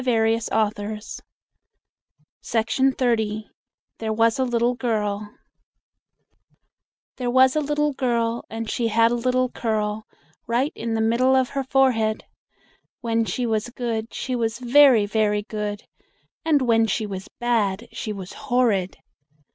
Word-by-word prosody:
ROBERT 225 Hz, -2 st, +1 dB
LOUIS 215 Hz, 0 st, -2 dB, 1.2 s
STEVENSON 255 Hz, +4 st, +1 dB, 1.0 s
THERE 220 Hz, -1 st, -2 dB
WAS 225 Hz, +2 st, +2 dB
A -, -, +3 dB
LITTLE 240 Hz, -1 st, +1 dB
GIRL 210 Hz, -4 st, -2 dB, 1.8 s
There 250 Hz, -2 st, -2 dB
was 260 Hz, +2 st, +5 dB
a -, -, +3 dB
little 295 Hz, 0 st, 0 dB
girl, 235 Hz, -3 st, -1 dB
And 225 Hz, 0 st, -5 dB
she 230 Hz, +1 st, -1 dB
had 230 Hz, +1 st, +3 dB
a -, -, +1 dB
little 255 Hz, +1 st, +1 dB
curl 215 Hz, -2 st, -2 dB, 0.4 s
Right 250 Hz, +6 st, +1 dB
in 225 Hz, 0 st, -3 dB
the 220 Hz, -, 0 dB
middle 240 Hz, +4 st, +3 dB
of 260 Hz, -2 st, +2 dB
her 275 Hz, -1 st, -2 dB
forehead. 250 Hz, -5 st, +1 dB, 0.8 s
When 230 Hz, -1 st, 0 dB
she 245 Hz, +2 st, -2 dB
was 220 Hz, 0 st, -1 dB
good 230 Hz, -2 st, -4 dB
She 255 Hz, -, -3 dB
was 230 Hz, -1 st, -1 dB
very, 255 Hz, -2 st, +5 dB
very 210 Hz, 0 st, 0 dB
good, 210 Hz, -1 st, -4 dB, 0.6 s
And 305 Hz, -4 st, +2 dB
when 225 Hz, -2 st, +3 dB
she 215 Hz, +1 st, -1 dB
was 195 Hz, -1 st, -6 dB
bad 230 Hz, -3 st, 0 dB
she 215 Hz, -, -5 dB
was 195 Hz, -3 st, -7 dB
horrid. 235 Hz, -9 st, 0 dB
230 Hz, 130 wpm, -23 LUFS, 215-250 Hz, 1.8 s, was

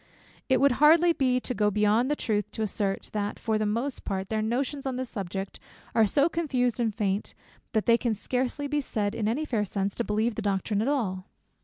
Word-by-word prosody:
It 260 Hz, -, +4 dB
would 280 Hz, 0 st, +5 dB
hardly 335 Hz, +3 st, +6 dB
be 255 Hz, -4 st, +2 dB
to 250 Hz, -, -3 dB
go 210 Hz, -3 st, +2 dB
beyond 210 Hz, +5 st, +2 dB
the 295 Hz, -, +2 dB
truth 210 Hz, -7 st, -1 dB
to 220 Hz, -, -2 dB
assert, 200 Hz, -1 st, -2 dB
that 205 Hz, -1 st, -2 dB
for 220 Hz, -2 st, -1 dB
the 215 Hz, -, 0 dB
most 235 Hz, +6 st, -2 dB
part 190 Hz, -1 st, -3 dB
their 220 Hz, -1 st, 0 dB
notions 265 Hz, +5 st, -1 dB
on 260 Hz, -, -2 dB
this 255 Hz, -1 st, -4 dB
subject 195 Hz, -2 st, -5 dB, 0.3 s
are 225 Hz, -2 st, +4 dB
so 280 Hz, +8 st, +3 dB
confused 255 Hz, -8 st, 0 dB
and 230 Hz, -2 st, +1 dB
faint, 200 Hz, -1 st, -2 dB, 0.4 s
that 220 Hz, -2 st, +1 dB
they 235 Hz, 0 st, +5 dB
can 235 Hz, -3 st, 0 dB
scarcely 255 Hz, +6 st, -2 dB
be 295 Hz, +1 st, 0 dB
said 210 Hz, -6 st, -2 dB
in 215 Hz, -2 st, -1 dB
any 270 Hz, +8 st, 0 dB
fair 225 Hz, -8 st, 0 dB
sense 195 Hz, 0 st, -2 dB
to 235 Hz, -, -2 dB
believe 220 Hz, +2 st, 0 dB
the -, -, -4 dB
doctrine 200 Hz, +1 st, 0 dB
at 225 Hz, -, 0 dB
all. 200 Hz, -10 st, -1 dB
225 Hz, 215 wpm, -27 LUFS, 210-260 Hz, 0.4 s, hardly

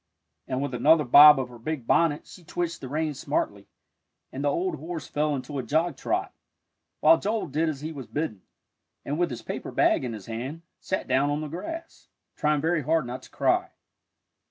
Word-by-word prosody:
And 130 Hz, +1 st, -2 dB
with 140 Hz, -2 st, -3 dB
another 150 Hz, +6 st, +4 dB
bob 145 Hz, +3 st, +9 dB
of 130 Hz, -1 st, -3 dB
her 120 Hz, -1 st, -12 dB
big 140 Hz, 0 st, -4 dB
bonnet 155 Hz, +2 st, +2 dB
she 180 Hz, -, -14 dB
twitched 170 Hz, 0 st, -3 dB
the 130 Hz, -, -7 dB
reins 155 Hz, 0 st, -2 dB
smartly, -, -, -2 dB, 0.6 s
and 135 Hz, -, -5 dB
the 145 Hz, -, +3 dB
old 180 Hz, +6 st, -1 dB
horse 160 Hz, +1 st, -6 dB
fell 150 Hz, 0 st, 0 dB
into 140 Hz, +1 st, -5 dB
a -, -, -3 dB
jog 160 Hz, +6 st, 0 dB
trot, -, -, -2 dB, 0.7 s
while 330 Hz, -, +6 dB
Joel 215 Hz, +2 st, -1 dB
did 160 Hz, +2 st, 0 dB
as 145 Hz, -3 st, -5 dB
he 155 Hz, +2 st, -4 dB
was 135 Hz, -6 st, -8 dB
bidden, 135 Hz, -, -3 dB, 0.6 s
and 145 Hz, +3 st, -2 dB
with 175 Hz, -, +2 dB
his 120 Hz, -, -7 dB
paper -, -, -5 dB
bag -, -, +2 dB
in 120 Hz, -2 st, -3 dB
his 105 Hz, -4 st, -8 dB
hand, 130 Hz, +9 st, -6 dB, 0.2 s
sat 190 Hz, -, -3 dB
down 135 Hz, +3 st, +2 dB
on 145 Hz, +1 st, -1 dB
the 155 Hz, -, -4 dB
grass, 325 Hz, -, -7 dB, 0.3 s
trying 150 Hz, -1 st, +1 dB
very 165 Hz, 0 st, +1 dB
hard 155 Hz, +1 st, +1 dB
not 125 Hz, +1 st, -6 dB
to -, -, -15 dB
cry. -, -, +1 dB
150 Hz, 200 wpm, -26 LUFS, 130-165 Hz, 0.7 s, bob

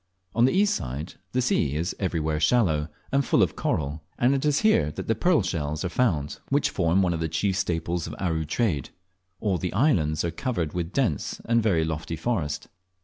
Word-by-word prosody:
On 115 Hz, +1 st, +4 dB
the 130 Hz, -, +3 dB
east 205 Hz, +2 st, +3 dB
side 70 Hz, +6 st, -4 dB, 0.2 s
the 125 Hz, 0 st, +1 dB
sea 75 Hz, -, +1 dB
is 85 Hz, +4 st, -2 dB
everywhere 80 Hz, -5 st, -1 dB
shallow, 80 Hz, -5 st, +2 dB, 0.2 s
and 140 Hz, +1 st, +3 dB
full 115 Hz, -, +3 dB
of 85 Hz, -, -1 dB
coral; 75 Hz, +1 st, -1 dB, 0.2 s
and 125 Hz, +3 st, +3 dB
it 135 Hz, -, 0 dB
is 150 Hz, -1 st, +2 dB
here 215 Hz, -, +4 dB
that -, -, -6 dB
the 115 Hz, -, +3 dB
pearl 160 Hz, -, +2 dB
shells 75 Hz, -4 st, -2 dB
are -, -, -1 dB
found 85 Hz, -, 0 dB
which 140 Hz, +1 st, +2 dB
form 90 Hz, +1 st, +2 dB
one 90 Hz, -2 st, +1 dB
of 80 Hz, -, -2 dB
the 80 Hz, 0 st, -1 dB
chief 95 Hz, +3 st, 0 dB
staples 85 Hz, -2 st, -1 dB
of -, -, -6 dB
Aru 80 Hz, -4 st, -1 dB
trade. 80 Hz, -, 0 dB, 0.5 s
All 100 Hz, -5 st, +1 dB
the 90 Hz, -, -3 dB
islands 90 Hz, -, +2 dB
are 85 Hz, -, -1 dB
covered 95 Hz, -, -2 dB
with 85 Hz, -2 st, -2 dB
a -, -, -12 dB
dense 105 Hz, -, -1 dB
and 115 Hz, 0 st, +3 dB
very 90 Hz, -8 st, +2 dB
lofty 80 Hz, +1 st, -3 dB
forest. 80 Hz, -9 st, -2 dB
90 Hz, 205 wpm, -26 LUFS, 80-115 Hz, 0.5 s, On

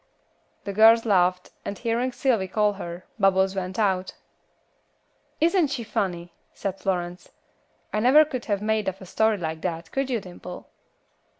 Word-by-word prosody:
The 200 Hz, -, -4 dB
girls 225 Hz, +2 st, +6 dB
laughed, 180 Hz, -3 st, +2 dB
and 200 Hz, -, -5 dB
hearing 240 Hz, +2 st, -1 dB
Sylvy 240 Hz, -7 st, +1 dB
call 210 Hz, +2 st, +1 dB
her, 175 Hz, -2 st, -8 dB
Bubbles 190 Hz, -1 st, +3 dB
went 185 Hz, 0 st, -4 dB
out. 190 Hz, -4 st, 0 dB, 1.2 s
"Isn't 340 Hz, +1 st, +3 dB
she 270 Hz, -4 st, -4 dB
funny?" 175 Hz, -5 st, -3 dB, 0.2 s
said 195 Hz, -1 st, -4 dB
Florence. 180 Hz, -2 st, -3 dB, 0.6 s
"I 210 Hz, -, +1 dB
never 270 Hz, +7 st, +6 dB
could 255 Hz, -5 st, -5 dB
have 205 Hz, -2 st, -1 dB
made 215 Hz, -2 st, +1 dB
up 190 Hz, 0 st, -9 dB
a 190 Hz, -, -10 dB
story 220 Hz, +3 st, +1 dB
like 160 Hz, -3 st, -4 dB
that, 170 Hz, -2 st, -4 dB
could 270 Hz, 0 st, -1 dB
you, 240 Hz, -3 st, 0 dB
Dimple?" 180 Hz, -1 st, -10 dB
200 Hz, 155 wpm, -25 LUFS, 185-230 Hz, 1.2 s, girls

